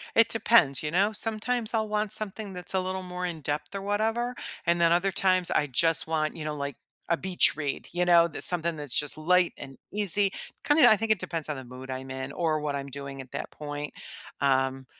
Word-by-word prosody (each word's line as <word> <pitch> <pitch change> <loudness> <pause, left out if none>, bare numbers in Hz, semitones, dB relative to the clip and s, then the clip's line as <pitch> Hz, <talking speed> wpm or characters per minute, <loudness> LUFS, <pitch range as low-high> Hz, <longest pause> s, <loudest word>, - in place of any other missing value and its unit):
It 230 0 +5
depends, 215 - +4
you 150 - -3
know? 195 +5 +3
Sometimes 225 +2 -1
I'll 220 -1 0
want 210 -1 0
something 210 -1 -4
that's 180 0 -6
a 190 - +2
little 185 0 -3
more 180 0 -5
in-depth 155 0 -4
or 195 - -3
whatever, 220 +4 0 0.3
and 170 0 +2
then 170 0 +4
other 185 +3 +2
times, 185 -1 +2
I 150 - +2
just 165 +5 +1
want, 155 -1 -1
you 155 - -6
know, 150 -1 -3
like, 140 -2 -5 0.3
a 170 - +2
beach 185 0 +3
read, 145 -2 -4
you 180 +1 0
know? 170 -1 +6
That's - - 0
something 170 -2 +2
that's 145 -4 -4
just 145 0 -2
light 180 +3 +3
and 135 -2 -10 0.2
easy, 205 -1 +1 0.3
kinda 295 -3 +6
I 215 - +7
think 220 +1 -1
it 215 - +3
depends 165 -3 -3
on 150 - -2
the 130 - -8
mood 130 +2 -9
I'm 130 +1 -6
in 130 +1 -5
or 155 0 0
what 145 -1 -2
I'm 140 0 -6
doing 140 0 -8
at 130 - -14
that - - -5
point, 145 0 -6 0.5
um, 135 -1 +1
170 Hz, 220 wpm, -27 LUFS, 145-200 Hz, 0.5 s, I